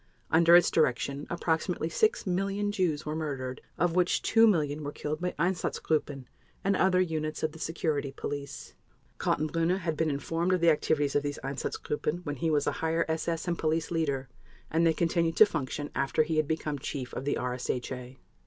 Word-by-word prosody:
Under 170 +1 +7
its 175 -1 +6
direction 140 -1 +1
approximately 170 0 -1
6 440 - +1
million 195 +2 0
Jews 175 -7 0
were 155 0 -3
murdered, 135 -5 -4 0.2
of 175 0 +1
which 180 -1 +2
2 225 0 +5
million 155 -6 +1
were 145 - -4
killed 155 +2 -4
by 180 0 -2
Einsatzgruppen 155 -5 -1 0.4
and 200 0 +2
other 185 -1 +3
units 155 -4 -1
of 155 - +1
the 160 - -12
Security 155 -4 -1
Police. 140 +1 -6 0.5
Kaltenbrunner 165 +4 +1
had 160 -2 -1
been 160 +1 +1
informed 165 +5 -1
of 185 - +2
the 170 -1 +6
activities 150 -2 +1
of 145 - +4
these 145 0 -3
Einsatzgruppen 150 +4 -3
when 145 -2 -3
he 165 +5 0
was 150 -2 +2
a - - +1
Higher 160 +1 +1
SS 160 +1 -2
and 170 -1 -1
Police 160 +1 0
Leader, 140 -5 -1 0.4
and 165 +1 +3
they 165 - +4
continued 165 0 0
to 215 - +10
function 145 -4 -4
after 140 +3 +1
he 155 0 -2
had 155 -2 +2
become 150 -2 -2
Chief 130 -2 -5
of - - -4
the 145 - 0
RSHA. 125 0 -4
160 Hz, 180 wpm, -29 LUFS, 145-170 Hz, 0.5 s, to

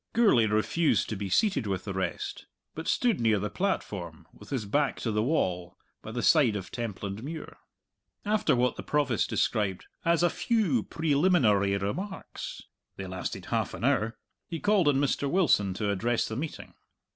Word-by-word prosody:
Gourlay 200 - +4
refused 110 +10 +1
to 110 - -2
be 100 -1 -4
seated 185 - +2
with 95 -2 -2
the 100 - -3
rest, 95 0 -4 0.3
but 160 - -6
stood 240 -5 +2
near 110 -2 +3
the 105 +1 -3
platform, 95 - -3
with - - -15
his 130 -6 -2
back 145 +8 0
to 115 - -1
the 105 0 +1
wall, 95 - -1 0.2
by 110 - -8
the 120 +1 -3
side 135 -10 +5
of 95 -3 -5
Templandmuir. 115 - -5 0.7
After 210 -7 +2
what 125 +1 +1
the - - -4
Provost 140 -8 0
described 100 -4 0 0.2
"as 170 0 +2
a 175 - +4
few 200 - +1
preliminary 140 - +2
remarks" 185 - -5 0.3
they 95 - -6
lasted 95 0 -5
half - - 0
an - - -8
hour 110 +1 +1 0.3
he 165 -2 -4
called 205 -4 +3
on 145 - +4
Mr. 140 0 +1
Wilson 135 - +3
to 105 0 -1
address 115 +4 0
the 110 - -5
meeting. 150 +5 -6
120 Hz, 170 wpm, -28 LUFS, 100-165 Hz, 0.7 s, side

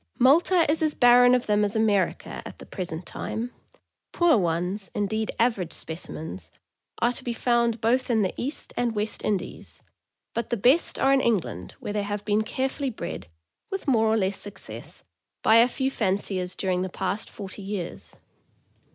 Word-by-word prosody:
Malta 330 +6 +5
is 310 +3 +1
as 310 -1 +1
barren 245 +1 +7
of 250 - 0
them 210 0 +2
as 205 +1 -1
America, 210 -4 +1
at - - -9
the - - -11
present 175 -3 -5
time; 235 +2 -4 0.6
poor 345 -4 +4
ones, 180 +1 -1
indeed 220 +1 -1
average 220 -8 +1
specimens, 155 - -6 0.5
are 240 - +3
to 245 - -6
be 240 - -2
found 235 -1 +1
both 250 +4 +1
in 225 -3 +3
the 190 - -1
East 280 +5 -4
and 240 -2 0
West 210 +1 -2
Indies, 205 -3 -3 0.5
but 235 -1 -3
the 235 - 0
best 255 - +3
are 270 0 +4
in 270 - +4
Eng 235 -4 +3
land, 100 - -8
where 205 - -5
they 210 - 0
have 205 0 -4
been 210 0 +2
carefully 265 +4 -2
bred, 225 - -6 0.4
with 385 -4 -5
more 225 -5 +4
or 220 +1 +3
less 195 -1 0
success, 205 -1 -7 0.4
by 220 - +6
a 235 +1 +7
few 265 +2 -1
fanciers 190 -4 -1
during 185 -2 0
the 185 - -2
past 195 +3 -3
forty 200 0 -8
years. 195 -3 -6
220 Hz, 175 wpm, -26 LUFS, 195-245 Hz, 0.6 s, barren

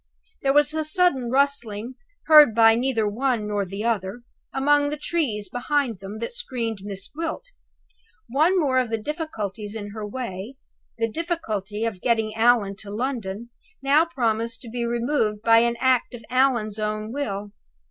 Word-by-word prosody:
There 270 - +2
was 295 +1 +4
a 315 0 -1
sudden 310 -7 +1
rustling 250 -4 0 0.3
heard 300 -8 +8
neither 225 +1 +4
by 205 - -1
one 240 -3 0
nor 205 -1 -1
the 195 +3 -5
other 225 -1 -1 0.3
among 290 +2 +3
the 300 - -3
trees 275 -11 -2
behind 245 -4 -1
them 195 +2 -8
that 230 - -5
screened 245 - -2
Miss 195 -1 -6
Gwilt. 330 +9 -5 0.8
One 315 +9 +3
more 265 -5 +2
of 250 -3 -1
the 225 - 0
difficulties 220 - -5
in 205 -2 -6
her 215 0 -6
way 210 +1 -6 0.4
(the 230 0 +1
difficulty 220 - -3
of 205 -6 -4
getting 225 -3 +1
Allan 225 -4 +3
to 205 - -9
London) 230 -1 -4 0.3
now 285 +4 +5
promised 230 -7 -2
to 235 - -9
be 240 0 -2
removed 235 -3 0
by 230 0 +6
an 235 0 +1
act 255 -1 +2
of 230 -2 -12
Allan's 240 -5 +2
own 215 0 -2
will. 205 -8 -3
235 Hz, 160 wpm, -24 LUFS, 215-275 Hz, 0.8 s, heard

